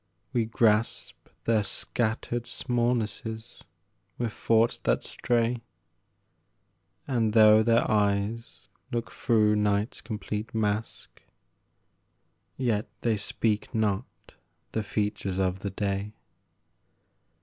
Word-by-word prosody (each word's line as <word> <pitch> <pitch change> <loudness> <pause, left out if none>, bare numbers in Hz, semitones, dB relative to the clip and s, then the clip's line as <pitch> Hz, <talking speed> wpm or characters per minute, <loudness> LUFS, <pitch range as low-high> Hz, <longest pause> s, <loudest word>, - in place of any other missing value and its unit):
We 120 -3 +2
grasp 110 0 +1
Their 115 -2 +3
scattered 115 +3 -2
smallnesses 120 -2 -2 0.6
with 115 -3 -2
thoughts 115 +1 +2
that - - +1
stray, 120 0 0 1.5
And, 115 -5 +1
though 110 -1 +7
their 115 +1 +3
eyes 105 +3 0 0.2
look 120 -2 -2
through 110 -3 +3
night's 105 +1 0
complete 110 0 -5
mask, 110 0 -2 1.4
Yet 115 -5 0
they 115 -2 +2
speak 105 +2 -1
not 105 0 +1 0.6
the 110 - -1
features 105 -2 -2
of 95 0 0
the 100 - -3
day. 100 +1 -2
110 Hz, 95 wpm, -28 LUFS, 105-115 Hz, 1.5 s, though